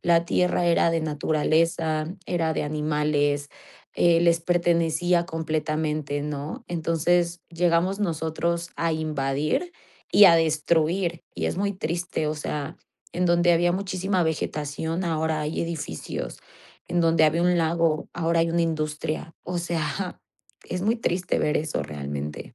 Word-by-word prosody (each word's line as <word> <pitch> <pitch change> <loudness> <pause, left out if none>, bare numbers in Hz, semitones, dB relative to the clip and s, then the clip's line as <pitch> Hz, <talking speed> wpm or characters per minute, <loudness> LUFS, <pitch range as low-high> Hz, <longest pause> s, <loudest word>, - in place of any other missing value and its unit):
La 170 -1 +3
tierra 180 0 +1
era 170 0 +4
de 165 -1 0
naturaleza, 155 +1 +1 0.2
era 165 -3 0
de - - -1
animales, 150 -1 0 0.4
eh, 170 -1 +4
les 170 -1 +4
pertenecía 170 0 +2
completamente, 155 -3 -2
¿no? 150 +1 -5
Entonces 170 +1 0
llegamos 175 +3 +1
nosotros 170 -1 -1
a 165 -1 0
invadir 155 - -1 0.4
y 205 - +8
a 170 -3 +8
destruir, 165 +2 +1
y - - -3
es - - -1
muy 200 0 0
triste, 170 -2 -2
o 155 - -1
sea, 150 +1 -4 0.4
en 180 +1 0
donde 175 0 +4
había 175 +1 +3
muchísima 185 -1 -1
vegetación, 160 +2 -2
ahora 160 -2 0
hay 150 +1 -2
edificios, 160 - -5 0.5
en 175 - +1
donde 165 -1 +4
había 160 +3 +2
un 180 0 +3
lago, 165 -1 +1
ahora 170 0 +1
hay 165 0 +1
una 170 0 +2
industria. 155 0 -3
O 180 0 -3
sea, 170 +2 -3 0.5
es 180 0 -3
muy 225 +4 +2
triste 180 -4 -1
ver 150 - +1
eso 150 - -2
realmente. 75 0 -6
165 Hz, 140 wpm, -25 LUFS, 155-175 Hz, 0.5 s, y